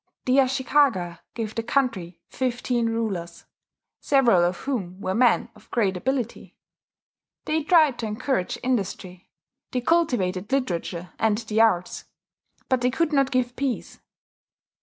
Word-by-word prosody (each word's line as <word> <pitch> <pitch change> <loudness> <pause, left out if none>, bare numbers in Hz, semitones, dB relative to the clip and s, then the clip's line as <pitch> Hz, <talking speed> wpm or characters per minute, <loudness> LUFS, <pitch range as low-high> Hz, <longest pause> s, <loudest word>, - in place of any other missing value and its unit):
The 255 +1 +3
Ashikaga 260 - +2 0.2
gave 220 -2 -4
the 230 - -2
country 225 -9 -1
fifteen 245 -2 -1
rulers, 200 -7 -3 0.5
several 240 -11 +4
of 175 +1 0
whom 195 -10 -4
were 185 - -2
men 240 +1 +3
of 210 0 -20
great 200 -5 +1
ability: 245 +4 -3 0.9
they 315 +1 0
tried 310 -5 +4
to 225 - -2
encourage 210 -2 -2
industry; 195 -6 -3 0.4
they 250 - -1
cultivated 240 - +1
literature 180 - -2
and 220 -2 +2
the 220 -1 0
arts; 180 -6 +1 0.6
but 260 -2 +1
they 250 - +2
could 305 +5 0
not 275 -2 +3
give 250 -1 0
peace. 270 -4 -3
235 Hz, 130 wpm, -24 LUFS, 190-265 Hz, 0.9 s, several